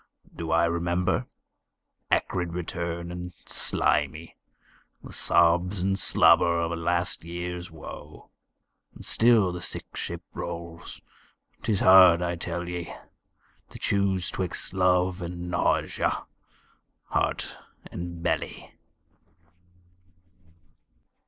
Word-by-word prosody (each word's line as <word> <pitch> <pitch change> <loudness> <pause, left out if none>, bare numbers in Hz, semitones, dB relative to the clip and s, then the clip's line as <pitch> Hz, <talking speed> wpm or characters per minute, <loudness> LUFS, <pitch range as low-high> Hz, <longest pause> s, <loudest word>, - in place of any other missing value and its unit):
Do 80 -1 -5
I 80 +1 +4
remember? 85 +1 0 0.8
Acrid 90 -2 0
return 85 0 -4
and 90 0 -6
slimy, 80 +1 0 0.7
The - - -10
sobs 90 +3 +3
and 95 +1 +1
slobber 85 -3 +4
of 85 0 -1
a - - -1
last 85 +1 -1
years 85 +1 -5
woe. 75 -1 -11 0.6
And - - -9
still 115 -5 +4
the 90 0 -6
sick - - -5
ship - - -5
rolls. 85 -1 -7 0.6
'Tis 105 -3 0
hard, 90 -2 +8
I 85 0 -1
tell 85 +1 -4
ye, 90 -1 -5 0.8
To - - -10
choose 95 -2 0
'twixt 90 -1 -4
love 90 0 +2
and 90 0 -5
nausea, 85 - 0 0.9
heart - - 0 0.4
and 85 -1 -6
belly. 85 - -2
85 Hz, 100 wpm, -27 LUFS, 85-90 Hz, 0.9 s, hard